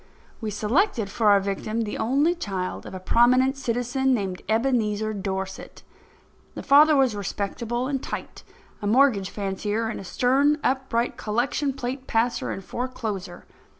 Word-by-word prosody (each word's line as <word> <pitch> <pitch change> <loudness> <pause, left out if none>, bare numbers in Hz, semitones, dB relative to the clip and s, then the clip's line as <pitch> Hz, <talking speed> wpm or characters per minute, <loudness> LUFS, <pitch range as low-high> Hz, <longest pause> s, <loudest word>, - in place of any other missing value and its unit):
We 220 - -2
selected 220 - 0
for 215 0 +2
our 200 -1 +6
victim 200 +3 -2
the 215 -2 -4
only 275 +9 +2
child 195 - -4
of - - -8
a - - -5
prominent 255 +7 +4
citizen 255 +1 0
named 190 -5 -3
Ebenezer 220 -2 +1
Dorset. 190 -1 -5 0.7
The - - -6
father 300 +2 +6
was 265 -5 +3
respectable 215 +5 -3
and 270 -1 -2
tight, - - -6 0.4
a 205 - -2
mortgage 220 -4 +3
fancier 205 +2 -2
and 220 - -5
a - - -7
stern, 270 +9 +2
upright 255 -3 0
collection 245 +6 -1
plate 260 0 -5
passer 230 +2 0
and 195 - -5
forecloser. 220 -5 -5
230 Hz, 145 wpm, -25 LUFS, 205-260 Hz, 0.7 s, our